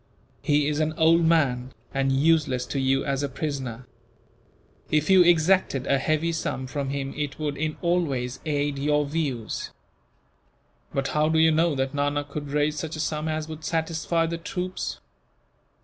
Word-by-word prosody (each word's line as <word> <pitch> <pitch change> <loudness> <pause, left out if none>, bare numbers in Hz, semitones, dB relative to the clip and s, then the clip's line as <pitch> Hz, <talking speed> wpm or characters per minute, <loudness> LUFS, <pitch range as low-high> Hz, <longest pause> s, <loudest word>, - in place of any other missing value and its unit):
He 145 -1 +2
is 150 0 0
an 155 0 +1
old 165 +1 +5
man, 130 -6 +2 0.2
and 135 0 +1
useless 140 -3 +2
to 140 - -3
you 135 0 +1
as 140 -1 -1
a 145 - -1
prisoner. 130 -4 -4 1.0
If 155 +4 +2
you 190 -1 +8
exacted 170 -5 +3
a 140 -1 +2
heavy 155 +4 +1
sum 145 -5 -3
from 135 +1 -3
him 135 0 -3
it 145 -2 -3
would, 150 -2 -2
in 155 +1 -2
all 175 +1 +3
ways, 125 -4 -3
aid 145 -2 -1
your 150 +1 +2
views." 140 -7 -3 1.2
"But 135 0 -1
how 150 +1 +2
do 160 - +2
you 160 0 +5
know 160 0 +2
that 135 +1 -1
Nana 145 0 0
could 145 0 -6
raise 150 +1 0
such 160 -1 -4
a - - -7
sum 155 0 -2
as 155 0 -2
would 155 -1 -8
satisfy 165 +1 0
the 165 0 -3
troops?" 180 +2 -4
150 Hz, 170 wpm, -25 LUFS, 135-160 Hz, 1.2 s, you